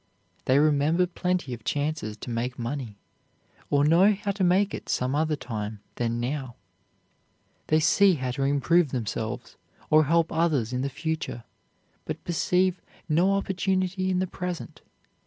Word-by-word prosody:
They 130 - +4
remember 155 +4 +3
plenty 180 -5 -2
of 115 -2 -8
chances 145 -7 -2
to 120 - -7
make 120 +2 -2
money, 120 -3 -4 0.7
or 145 0 +3
know 180 +7 +5
how 200 0 -2
to 195 -1 -2
make 190 +3 +3
it - - -7
some 125 +1 0
other 155 +1 +1
time 110 -5 -5 0.2
than 120 -1 -1
now; 130 0 -3 1.1
they 155 - +3
see 190 +4 +5
how 130 -3 -3
to 130 - -4
improve 145 +4 +3
themselves 120 0 -4 0.3
or 155 0 +6
help 165 +2 +2
others 150 -8 +1
in 125 - -1
the 140 - -1
future, 160 -5 -4 0.6
but - - -5
perceive 180 +2 +1 0.3
no 175 +5 +3
opportunity 190 -1 0
in 185 - +1
the 185 - +1
present. 180 -1 -6
155 Hz, 150 wpm, -26 LUFS, 125-180 Hz, 1.1 s, or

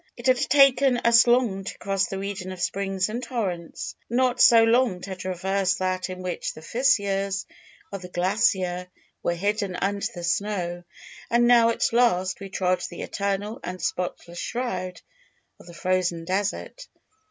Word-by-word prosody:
"It 240 - -10
had 255 -1 +4
taken 275 -2 +4
us 235 0 +5
long 240 -6 +2
to - - -7
cross 195 -2 0
the 195 - -5
region 195 -1 -5
of 185 - -8
springs 195 0 -1
and 230 +3 -4
torrents; 200 -9 -4
not 250 +1 +1
so 230 -1 +8
long 230 -4 +3
to 190 0 -6
traverse 185 +1 -1
that 185 0 -2
in 185 0 -7
which 180 -2 -4
the 155 - -11
fissures 200 -5 +1 0.5
of 195 -2 -6
the 180 - -8
glacier 180 -1 0 0.3
were 175 - 0
hidden 200 +1 -1
under 200 +2 -1
the 175 - -7
snow; 175 -1 -2 0.4
and 240 +1 +3
now 235 -1 +6
at 230 - 0
last 190 -7 +2
we 195 - -8
trod 185 -1 0
the 175 - -7
eternal 200 +2 -3
and 185 +1 -5
spotless 175 -1 -4
shroud 185 -7 -3 0.6
of - - -16
the 175 - -11
frozen 180 -2 -1
desert. 200 - -3
195 Hz, 160 wpm, -25 LUFS, 185-230 Hz, 0.6 s, so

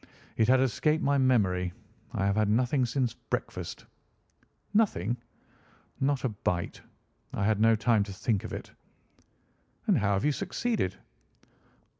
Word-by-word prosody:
It 110 - +3
had 130 +1 +5
escaped 150 +5 +1
my 140 0 +3
memory. 95 -9 +2 0.4
I 95 - 0
have 100 0 +2
had 110 -1 +2
nothing 125 +3 +2
since 125 -1 0
breakfast." - - -5 0.9
"Nothing?" 120 - +2 0.8
"Not 140 0 +1
a 130 - +1
bite. 90 -4 -2 0.5
I 100 - -1
had 110 -1 +2
no 115 0 +6
time 110 0 +3
to 100 - -8
think 100 +1 -1
of - - -6
it." - - -6 1.1
"And 205 - +4
how 100 -1 +2
have 100 +5 0
you 150 - +4
succeeded?" 200 - -1
115 Hz, 140 wpm, -29 LUFS, 100-135 Hz, 1.1 s, no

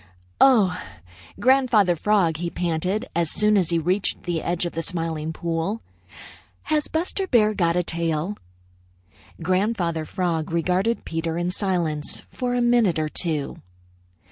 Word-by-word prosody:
"Oh, 210 -10 +5 0.6
Grandfather 240 -8 +4
Frog," 175 -3 +2
he 170 +1 -3
panted, 175 +4 -1
as 170 -2 +1
soon 210 +4 +3
as 185 -5 +2
he 170 - +1
reached 180 +5 0
the 170 -2 -2
edge 175 0 -1
of 175 - -4
the 165 - -2
Smiling 165 -2 -3
Pool, 170 +7 -3 0.8
"has 305 -1 0
Buster 360 +4 -1
Bear 215 -7 +4
got 170 -4 +1
a 180 - +2
tail?" 165 +3 -2 1.1
Grandfather 185 -3 0
Frog 165 -2 -2
regarded 180 +7 0
Peter 165 0 -2
in 175 +1 -1
silence 175 -6 -2
for 250 -1 -2
a 245 - +1
minute 240 -7 +3
or 155 -1 -1
two. 155 -4 -2
175 Hz, 140 wpm, -23 LUFS, 165-210 Hz, 1.1 s, Oh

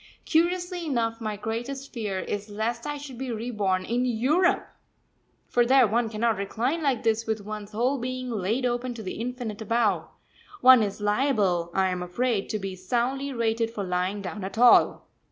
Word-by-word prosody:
Curiously 350 +1 +1
enough, 230 -4 -1
my 215 -2 -3
greatest 240 +6 -5
fear 210 -6 -3
is 205 +2 -4
lest 230 +4 -3
I 295 0 -3
should 275 -4 -9
be 265 -2 -3
reborn 210 -5 -1
in 240 +2 0
Europe! 255 +10 +2 0.8
For 240 - +3
there 260 +1 +5
one 225 +2 +1
cannot 225 0 0
recline 235 +11 -1
like 275 -6 0
this 225 0 +1
with 220 -1 -1
one's 210 -1 -6
whole 250 +5 0
being 255 0 -4
laid 220 +4 -1
open 245 0 -1
to 225 - -7
the 190 +3 -5
infinite 240 -3 -4
above 230 -1 +1 0.5
one 255 -5 +8
is 205 -1 -2
liable, 205 -6 +1
I 190 -1 +3
am 180 -1 -2
afraid, 205 +4 -1
to 215 - -1
be 195 -2 -5
soundly 245 +9 -1
rated 230 -2 0
for 220 -3 -5
lying 185 +2 -1
down 200 +1 -5
at 195 +3 -6
all. 245 +1 +5
230 Hz, 175 wpm, -26 LUFS, 205-255 Hz, 0.8 s, one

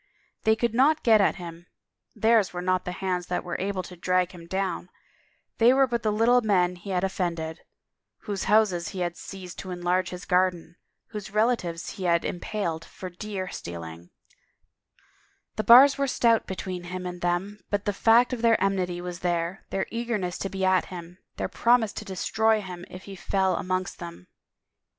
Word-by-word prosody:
They 220 0 +5
could 235 0 -1
not 290 +6 +3
get 220 -3 +6
at - - +3
him, 170 -1 -9 0.5
theirs 220 -2 +3
were 175 - -4
not 185 0 +1
the 180 - -3
hands 180 -2 -1
that 180 - -2
were 175 - -4
able 190 -1 -2
to 180 - -10
drag 180 +1 +1
him 170 -2 -12
down, 190 0 -2 0.7
they 235 +2 +6
were 270 0 +5
but 240 -2 -2
the 215 - +1
little 235 +4 +4
men 180 -5 +2
he 180 +3 -10
had 185 -1 0
offended, 170 -4 -2 0.6
whose 200 -2 -4
houses 200 -5 +3
he 190 -2 -5
had 175 -1 -1
seized 185 -2 -9
to 190 - -7
enlarge 180 +1 0
his 180 0 -8
garden, 180 -2 +1 0.3
whose 210 -3 -6
relatives 210 -6 0
he 190 - -6
had 170 -1 +2
impaled 175 -3 -3
for 185 +1 -9
deer 190 0 -5
stealing; 85 0 -8 1.5
the 215 - -1
bars 270 +5 +8
were 275 - +2
stout 230 -3 +2
be 190 - -4
tween 180 -2 -5
him 180 +1 -5
and 180 0 -6
them 175 +4 -1
but 205 -1 -1
the 205 - 0
fact 235 +5 +4
of 240 - -3
their 230 -1 +4
enmity 185 -2 0
was 175 -1 -6
there, 175 +1 -2
their 195 - -1
eagerness 225 -7 -2
to 195 - -3
be 190 -1 -2
at 185 -1 +3
him, 180 0 -9 0.2
their - - -1
promise 235 -3 +2
to - - -6
de 190 - -6
stroy 220 +4 +2
him 180 -3 -8
if 185 +1 -10
he 195 - -9
fell 190 0 0
amongst 185 +1 -2
them. 170 - -9
185 Hz, 185 wpm, -26 LUFS, 175-215 Hz, 1.5 s, bars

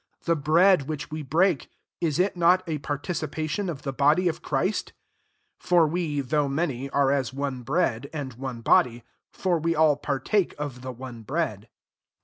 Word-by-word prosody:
The 170 - +2
bread 160 +1 +4
which 150 -1 -5
we 155 0 -4
break, 160 +3 +1 0.3
is 160 -4 0
it 185 +2 +1
not 180 +2 +4
a 155 -2 -2
participation 155 +5 -3
of 150 -5 -6
the 135 - -3
body 150 +7 +3
of 165 - -2
Christ? 170 +9 -1 0.7
17 - - -19
(For 175 -2 +6
we, 155 -2 -1
though 145 +2 0
many, 140 -3 -2
are 140 0 +2
aa 140 -1 +2
one 135 -1 -3
bread, 135 -2 0
and 145 -5 -5
one 125 -1 -6
body: 120 0 +3 0.3
for 180 -3 0
we 165 +1 0
all 155 -2 +4
partake 150 +8 0
of 145 -4 -5
the 130 0 -5
one 125 -1 -9
bread.) 130 - -3
150 Hz, 170 wpm, -26 LUFS, 135-170 Hz, 0.7 s, For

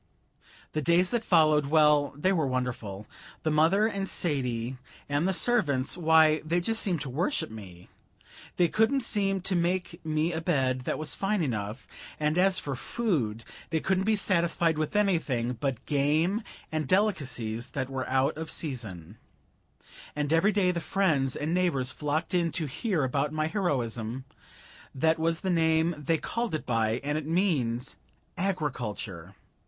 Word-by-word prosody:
The 155 - -1
days 170 +4 +3
that 240 -2 0
followed 155 -6 +4
well, 150 -2 +4
they 185 +6 +2
were 160 -6 +1
wonderful. 120 -6 -3 0.4
The 155 - +1
mother 165 +8 +4
and 200 -3 -2
Sadie 130 -6 -1 0.3
and 145 +5 0
the - - +2
servants 170 - +1
why, 160 -2 +4
they 165 +3 +1
just 225 +6 0
seemed 175 -7 -1
to 150 - -4
worship 170 - -1
me. 95 -5 -11 0.7
They 175 - +4
couldn't 225 - +2
seem 195 -4 +1
to 190 - -1
make 175 0 -1
me 155 +2 0
a 160 - -2
bed 130 -5 0
that - - -1
was 155 0 -2
fine 195 -2 0
enough; 110 -2 -4 0.3
and 150 0 +1
as 185 +1 +3
for 140 -2 -3
food, 125 - -2 0.2
they 160 - 0
couldn't 190 +3 0
be 220 0 +3
satisfied 170 -4 +1
with 155 +6 -2
anything 155 - +1
but 130 +1 -3
game 155 +8 +1 0.3
and 155 -3 -2
delicacies 135 - 0
that 130 -2 -3
were 130 -1 -4
out 130 +1 +2
of 160 0 -5
season; 110 - -4 1.0
and 150 +1 -1
every 165 +6 +4
day 195 -3 +2
the 175 - -2
friends 155 -7 +1
and 155 +3 -2
neighbors 165 -8 +1
flocked 150 +4 -2
in 170 -2 +1
to 165 -4 0
hear 165 - -1
about 140 +3 0
my 155 0 -1
heroism 130 - -2 0.7
that 160 +4 +2
was 165 +1 0
the 190 - -1
name 160 0 +2
they 150 +2 0
called 230 +2 -2
it 155 - -5
by, 115 -1 0
and 145 +2 -1
it 155 - -8
means 140 -9 0 0.4
agriculture. 120 - -3
155 Hz, 160 wpm, -28 LUFS, 130-180 Hz, 1.0 s, followed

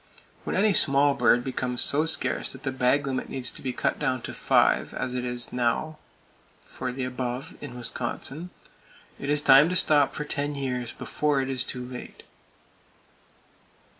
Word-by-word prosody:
When - - -2
any 205 +2 +3
small 140 -3 +4
bird 120 -3 +3
becomes 125 -1 -2
so 150 +3 +2
scarce 160 - 0
that 135 0 -12
the 135 - -1
bag 130 +2 +2
limit 130 -2 -3
needs 130 -2 -2
to - - -10
be 130 - -2
cut - - -1
down 130 -4 -1
to - - -6
five, - - +2
as 125 - -3
it 125 -1 -3
now 125 +6 -1 0.6
is - - -23
for 130 - -5
the 130 +1 -4
above 125 0 -4
in 125 -4 -8
Wisconsin, 130 +7 -4 0.7
it 140 - -4
is 150 0 +1
time 140 +3 +7
to 180 - -1
stop 150 -5 +4
for 150 - -3
ten 145 0 -2
years, 125 -3 -3
before 150 +2 -1
it 135 0 -1
is 130 -1 -1
too 125 -1 -5
late. 125 0 -9
135 Hz, 170 wpm, -26 LUFS, 125-145 Hz, 0.7 s, time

